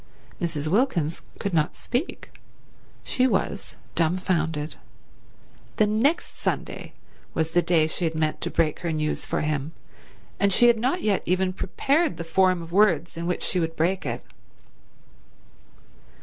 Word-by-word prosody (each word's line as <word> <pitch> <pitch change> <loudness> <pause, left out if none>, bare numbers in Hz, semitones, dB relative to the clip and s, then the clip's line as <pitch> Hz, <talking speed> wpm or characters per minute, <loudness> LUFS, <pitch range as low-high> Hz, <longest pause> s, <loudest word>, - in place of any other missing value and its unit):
Mrs. 160 -3 -2
Wilkins 175 - +1 0.2
could 200 - -3
not 155 -2 +1
speak. 255 +8 -3 0.7
She 255 -1 +2
was 200 -3 -1 0.2
dumbfounded. 165 -3 0 1.0
The 215 - +5
next 230 +11 +1
Sunday - - -3 0.4
was 160 0 0
the 175 +1 +4
day 170 -3 +3
she 165 +2 -2
had 160 -1 -1
meant 155 -1 0
to - - -1
break 155 -2 +1
her 170 - -2
news 155 -1 -1
to - - -1
him, 150 0 -2 0.7
and 200 0 +3
she 240 - +5
had 235 -2 +5
not 265 +10 0
yet 205 -3 +2
even 185 +1 +1
prepared 280 - +1
the 170 - -4
form 185 +1 +2
of 165 - -11
words 175 -5 +3
in 170 +1 -3
which 180 - -1
she 185 - +1
would 165 -1 -1
break 180 +4 +1
it. - - -4
175 Hz, 150 wpm, -25 LUFS, 160-205 Hz, 1.0 s, The